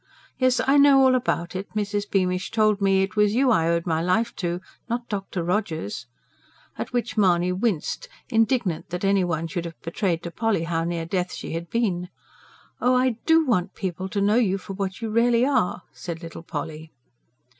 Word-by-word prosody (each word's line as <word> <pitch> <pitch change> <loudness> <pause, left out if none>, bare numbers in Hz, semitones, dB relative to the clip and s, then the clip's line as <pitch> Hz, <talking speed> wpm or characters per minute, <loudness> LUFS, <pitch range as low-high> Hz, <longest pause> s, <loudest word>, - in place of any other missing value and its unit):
Yes, 255 -1 +3
I 280 +2 +5
know 280 -1 +7
all 260 -1 +5
about 190 -9 -1
it; 190 +2 -4
Mrs. 205 -1 -1
Beamish 185 -1 0
told 215 -2 +2
me 195 -1 +3
it 195 0 -4
was 210 0 +3
you 260 0 +4
I 165 -7 +3
owed 170 0 +1
my 160 -2 0
life 215 +7 +1
to, 175 -1 -2 0.3
not 235 +1 -2
Dr. 195 -3 -3
Rogers" 160 - -2 0.7
at - - -5
which 245 -2 -2
Mahony 180 -3 +3
winced, 205 - -1 0.2
indignant 225 -7 +1
that 180 +2 -3
anyone 180 -5 +1
should 170 0 -4
have 165 -1 -8
betrayed 170 0 -1
to 170 - -5
Polly 225 -4 0
how 165 -1 -1
near 170 -1 -2
death 180 +1 -2
she - - -6
had 165 +1 -4
been. 185 -7 -1 0.7
"Oh, 250 +1 +3
I 250 -2 +2
DO 325 0 +5
want 185 -8 0
people 185 0 -4
to 200 - -1
know 205 +3 +3
you 200 -6 +2
for 195 +1 -8
what 195 +2 -4
you 220 - -2
really 235 +2 +3
are!" 180 -10 +1
said 170 -1 -7
little 165 0 -8
Polly. 160 -1 -6
195 Hz, 190 wpm, -24 LUFS, 170-230 Hz, 0.7 s, know